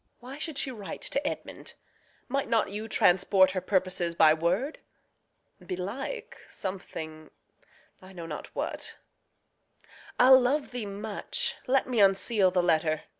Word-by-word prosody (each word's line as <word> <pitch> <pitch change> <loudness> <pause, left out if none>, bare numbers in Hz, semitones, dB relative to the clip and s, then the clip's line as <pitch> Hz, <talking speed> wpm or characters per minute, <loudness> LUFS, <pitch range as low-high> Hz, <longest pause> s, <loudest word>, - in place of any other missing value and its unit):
Why 260 +4 -9
should 315 -2 -3
she 265 - 0
write 210 -6 -7
to 285 +1 -2
Edmund? - - -6 0.5
Might 275 +2 -2
not 225 -3 +2
you 215 +2 -5
Transport 190 -1 +4
her 185 -1 -2
purposes 185 -2 0
by 155 -2 +6
word? 180 - -1 0.8
Belike, 245 - -5
Something 160 -5 -6 0.7
I 185 0 -13
know 175 -3 -8
not 155 -2 -6
what - - -4 1.2
I'll 260 +1 +8
love 270 +3 0
thee 245 -4 -4
much 205 +1 -2
Let 265 +1 +3
me 250 -3 0
unseal 195 0 +4
the 180 -1 +1
letter. 155 -2 +1
195 Hz, 130 wpm, -28 LUFS, 180-250 Hz, 1.2 s, I'll